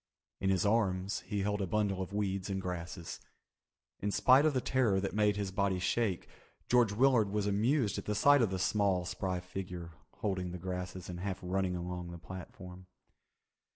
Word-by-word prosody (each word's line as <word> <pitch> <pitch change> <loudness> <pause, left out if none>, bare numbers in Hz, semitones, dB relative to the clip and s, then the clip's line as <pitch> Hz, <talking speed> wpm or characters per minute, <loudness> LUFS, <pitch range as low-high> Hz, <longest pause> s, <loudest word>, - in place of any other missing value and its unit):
In 95 - 0
his 95 +1 +2
arms 100 -3 +1
he 105 -3 -1
held 105 0 0
a 95 - -1
bundle 100 0 0
of 95 - -5
weeds 100 -1 -2
and 95 -1 -1
grasses. 90 -2 -5 0.8
In 105 - -1
spite 130 +8 +5
of 150 - 0
the - - +3
terror 120 -6 +2
that 100 - -3
made 105 0 +3
his 100 -2 -2
body 100 -1 +1
shake, 95 +1 0 0.4
George 120 -4 +4
Willard 120 -1 +4
was 105 0 -1
amused 105 +3 +1
at - - -8
the 105 - -1
sight 145 +6 +6
of 115 - +3
the 95 - -2
small 95 -1 +1
spry 90 0 -2
figure 90 -2 -6 0.3
holding 95 -3 -1
the - - -4
grasses 90 0 -5
and 90 -1 -6
half 95 0 -3
running 90 0 0
along 90 0 -4
the 85 - -7
platform. 90 +1 -10
95 Hz, 185 wpm, -33 LUFS, 90-105 Hz, 0.8 s, sight